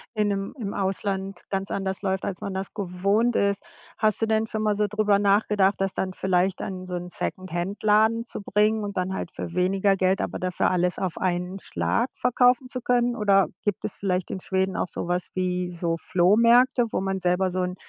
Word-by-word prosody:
in 210 Hz, -1 st, +2 dB
'nem 195 Hz, 0 st, -3 dB
im 205 Hz, -3 st, -4 dB
Ausland 195 Hz, -1 st, -2 dB
ganz 195 Hz, 0 st, -2 dB
anders 190 Hz, 0 st, -2 dB
läuft, 190 Hz, -1 st, -1 dB
als 185 Hz, -3 st, -4 dB
man 200 Hz, -, -4 dB
das 190 Hz, 0 st, -4 dB
gewohnt 200 Hz, +4 st, 0 dB
ist. 200 Hz, 0 st, +1 dB, 0.3 s
Hast 215 Hz, 0 st, +1 dB
du -, -, +3 dB
denn 220 Hz, 0 st, +1 dB
schon 215 Hz, -1 st, -3 dB
mal 210 Hz, -1 st, +2 dB
so 210 Hz, 0 st, +1 dB
drüber 210 Hz, -1 st, +2 dB
nachgedacht, 200 Hz, -1 st, +3 dB
das 195 Hz, -1 st, -1 dB
dann 185 Hz, -1 st, -2 dB
vielleicht 185 Hz, 0 st, 0 dB
an 185 Hz, -1 st, -5 dB
so 180 Hz, -, -4 dB
'n 175 Hz, 0 st, -5 dB
Secondhandladen 210 Hz, +7 st, 0 dB
zu 220 Hz, -, -6 dB
bringen 210 Hz, +2 st, +1 dB
und 200 Hz, -2 st, -5 dB
dann 185 Hz, +1 st, -1 dB
halt 175 Hz, -, -4 dB
für 170 Hz, -, -6 dB
weniger 195 Hz, +2 st, +2 dB
Geld, 185 Hz, 0 st, +1 dB
aber -, -, -3 dB
dafür 185 Hz, 0 st, 0 dB
alles 180 Hz, 0 st, +1 dB
auf 185 Hz, -4 st, -2 dB
einen 180 Hz, +1 st, -2 dB
Schlag 235 Hz, +6 st, -1 dB
verkaufen 250 Hz, +1 st, +3 dB
zu 255 Hz, -1 st, -5 dB
können? 245 Hz, 0 st, +1 dB
Oder 200 Hz, -2 st, +3 dB, 0.2 s
gibt 205 Hz, -3 st, -2 dB
es -, -, -3 dB
vielleicht 185 Hz, -2 st, -2 dB
in -, -, -4 dB
Schweden 190 Hz, 0 st, 0 dB
auch -, -, -1 dB
so -, -, -4 dB
was 180 Hz, 0 st, -1 dB
wie 180 Hz, -1 st, -1 dB
so 170 Hz, -1 st, -1 dB
Flohmärkte, 230 Hz, +8 st, +4 dB
wo -, -, 0 dB
man 195 Hz, 0 st, -2 dB
selber 180 Hz, +1 st, +1 dB
so 185 Hz, 0 st, -1 dB
'n 180 Hz, 0 st, -2 dB
195 Hz, 205 wpm, -25 LUFS, 185-210 Hz, 0.3 s, Flohmärkte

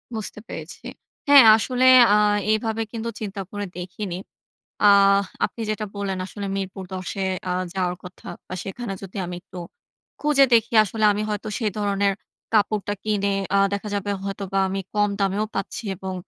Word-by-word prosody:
বুঝতে 215 Hz, -1 st, -6 dB
পেরেছি। -, -, -9 dB, 0.4 s
হ্যাঁ, 280 Hz, -4 st, +9 dB
আসলে 250 Hz, +3 st, 0 dB, 0.3 s
আ -, -, +5 dB, 0.4 s
এভাবে 220 Hz, 0 st, -1 dB
কিন্তু 230 Hz, 0 st, -4 dB
চিন্তা 200 Hz, -2 st, -5 dB
করে 205 Hz, 0 st, -4 dB
দেখিনি। 180 Hz, +1 st, -5 dB, 0.7 s
আহ 200 Hz, 0 st, +6 dB, 0.2 s
আপনি -, -, -4 dB
যেটা 215 Hz, 0 st, -2 dB
বললেন 195 Hz, -2 st, -3 dB
আসলে 200 Hz, +1 st, -6 dB
মিরপুর 190 Hz, 0 st, -5 dB
১০ 185 Hz, -1 st, -5 dB
এ -, -, 0 dB, 0.2 s
আ -, -, +1 dB, 0.2 s
যাওয়ার 180 Hz, -2 st, 0 dB
কথা 180 Hz, 0 st, -11 dB, 0.2 s
বা -, -, -6 dB
সেখানে 200 Hz, +2 st, -5 dB
যদি 195 Hz, +1 st, -9 dB
আমি 175 Hz, -, -6 dB
একটু 180 Hz, -, -11 dB, 0.6 s
খুঁজে 295 Hz, -2 st, +4 dB
দেখি 230 Hz, 0 st, +3 dB
আসলে 215 Hz, +2 st, -2 dB
আমি 210 Hz, -, -2 dB
হয়তো 210 Hz, +1 st, -3 dB
সে 230 Hz, -, -2 dB
ধরনের 200 Hz, -1 st, +1 dB, 0.4 s
কাপড়টা 205 Hz, -1 st, +1 dB
কিনে 200 Hz, -2 st, 0 dB, 0.2 s
আ -, -, +4 dB
দেখা 200 Hz, +1 st, -3 dB
যাবে 205 Hz, 0 st, -2 dB
হয়তোবা 195 Hz, 0 st, -3 dB
আমি 195 Hz, +1 st, -2 dB
কম 205 Hz, 0 st, +3 dB
দামেও 200 Hz, +2 st, +1 dB
পাচ্ছি 195 Hz, +4 st, -4 dB
এবং 190 Hz, 0 st, -5 dB
200 Hz, 160 wpm, -23 LUFS, 195-215 Hz, 0.7 s, হ্যাঁ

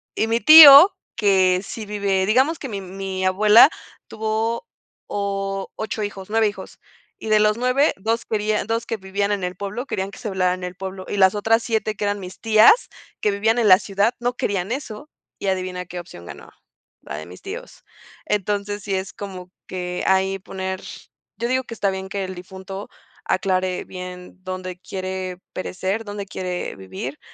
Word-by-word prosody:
y -, -, +1 dB
mi 225 Hz, +1 st, +1 dB
tío, 310 Hz, +5 st, +10 dB, 0.2 s
que 190 Hz, -4 st, +3 dB
sí 215 Hz, +2 st, -7 dB
vive, 200 Hz, -2 st, 0 dB
digamos 260 Hz, +10 st, +2 dB
que 275 Hz, -, -7 dB
mi 200 Hz, -3 st, -5 dB
mi 190 Hz, 0 st, -5 dB
abuela 210 Hz, +7 st, +7 dB, 0.4 s
tuvo 220 Hz, -, -2 dB, 0.4 s
8 200 Hz, +2 st, -3 dB
hijos, 195 Hz, -2 st, -6 dB
9 225 Hz, 0 st, +3 dB
hijos, 205 Hz, -, -8 dB, 0.4 s
y -, -, -8 dB
de 215 Hz, 0 st, +5 dB
los 210 Hz, +1 st, +3 dB
9, 255 Hz, +4 st, +2 dB
2 225 Hz, +4 st, -2 dB
querían 210 Hz, -1 st, -1 dB
2 225 Hz, 0 st, -1 dB
que 225 Hz, -, -2 dB
vivían 200 Hz, +1 st, -2 dB
en 200 Hz, -2 st, -1 dB
el 180 Hz, 0 st, -3 dB
pueblo, 200 Hz, +6 st, -5 dB
querían 190 Hz, -7 st, -3 dB
que -, -, -12 dB
se 235 Hz, -4 st, -4 dB
velara 185 Hz, -1 st, +1 dB
en 185 Hz, -, -10 dB
el 180 Hz, 0 st, -5 dB
pueblo, 190 Hz, 0 st, -7 dB
y -, -, -4 dB
las 190 Hz, 0 st, +5 dB
otras 225 Hz, +2 st, +2 dB
7 220 Hz, -2 st, -1 dB
que 205 Hz, -, -3 dB
eran 205 Hz, 0 st, -1 dB
mis 185 Hz, -1 st, -9 dB
tías, 225 Hz, -, +5 dB, 0.3 s
que 210 Hz, -, +2 dB
vivían 220 Hz, +4 st, +1 dB
en 225 Hz, -, +3 dB
la 185 Hz, -2 st, +9 dB
ciudad, 200 Hz, +3 st, 0 dB
no 245 Hz, +1 st, -1 dB
querían 195 Hz, 0 st, -2 dB
eso, 260 Hz, 0 st, -5 dB, 0.3 s
y -, -, -4 dB
adivina 185 Hz, -1 st, -2 dB
qué 180 Hz, 0 st, -7 dB
opción 165 Hz, -, -11 dB
ganó, -, -, -11 dB, 0.5 s
la 70 Hz, -, -7 dB
de 80 Hz, -, -7 dB
mis 90 Hz, +1 st, -13 dB
tíos. -, -, -8 dB, 0.4 s
Entonces, 205 Hz, 0 st, -2 dB
sí 200 Hz, -2 st, -2 dB
es 190 Hz, -1 st, -4 dB
como 185 Hz, -3 st, -8 dB, 0.2 s
que 180 Hz, -1 st, -4 dB
ahí 190 Hz, 0 st, +2 dB
poner, 190 Hz, 0 st, -5 dB, 0.6 s
yo 235 Hz, -, -2 dB
digo 260 Hz, +1 st, 0 dB
que 235 Hz, -, -9 dB
está 200 Hz, -2 st, 0 dB
bien 190 Hz, 0 st, -6 dB
que 200 Hz, 0 st, -3 dB
el 190 Hz, 0 st, -5 dB
difunto 190 Hz, +2 st, -9 dB, 0.4 s
aclare 185 Hz, -1 st, 0 dB
bien 180 Hz, -1 st, -9 dB
dónde 185 Hz, -1 st, -6 dB
quiere 185 Hz, -1 st, -5 dB
perecer, 190 Hz, +4 st, -3 dB
dónde 205 Hz, -1 st, -6 dB
quiere 185 Hz, -1 st, -4 dB
vivir. 95 Hz, +9 st, -7 dB
195 Hz, 180 wpm, -22 LUFS, 185-215 Hz, 0.6 s, tío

